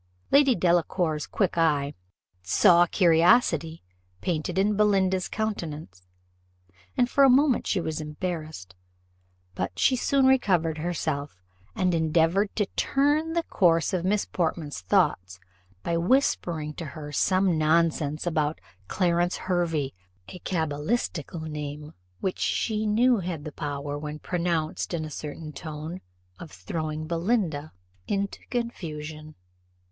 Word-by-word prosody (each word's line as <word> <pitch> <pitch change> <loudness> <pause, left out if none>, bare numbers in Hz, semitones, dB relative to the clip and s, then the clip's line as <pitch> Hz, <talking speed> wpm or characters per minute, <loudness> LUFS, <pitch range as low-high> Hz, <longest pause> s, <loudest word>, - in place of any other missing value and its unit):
Lady 275 -3 +5
Delacour's 170 -3 +1
quick 185 -4 0
eye 145 -3 +2 0.5
saw 175 - +5
curiosity 165 -2 +3 0.4
painted 170 - -2
in 205 +2 +2
Belinda's 190 -3 +2
countenance, 160 - -4 1.0
and 245 - +4
for 275 +3 +3
a 270 - +7
moment 265 0 +3
she 195 - +1
was 160 -2 -3
embarrassed; 155 - -5 0.8
but 90 +1 -4
she 260 - +3
soon 270 +2 +2
recovered 180 -12 +2
herself, 150 - -3 0.4
and 185 -1 +1
endeavoured 165 +5 +2
to 210 - +1
turn 295 +4 +1
the 335 0 +1
course 170 - +2
of 180 -2 0
Miss 200 +2 +1
Portman's 160 - -2
thoughts 90 0 +1 0.4
by 170 - -1
whispering 170 - +1
to 165 - -7
her 150 +1 -8
some 185 +3 +2
nonsense 155 -1 +1
about 155 -2 0 0.3
Clarence 175 -1 +1
Hervey 170 -6 -1 0.4
a 180 - -9
cabalistical 160 +1 -2
name, 150 -1 -6 0.3
which 190 - -2
she 215 -1 0
knew 240 +4 +4
had 170 -5 -4
the 155 - -6
power, 145 0 -4
when 150 0 -5
pronounced 170 0 -2
in 160 -2 -3
a 155 - -8
certain 150 +1 -7
tone, 155 +3 -7 0.4
of - - -9
throwing 155 - -4
Belinda 170 -3 -1 0.4
into 200 0 -2
confusion. 155 -10 -5
165 Hz, 120 wpm, -26 LUFS, 150-190 Hz, 1.0 s, a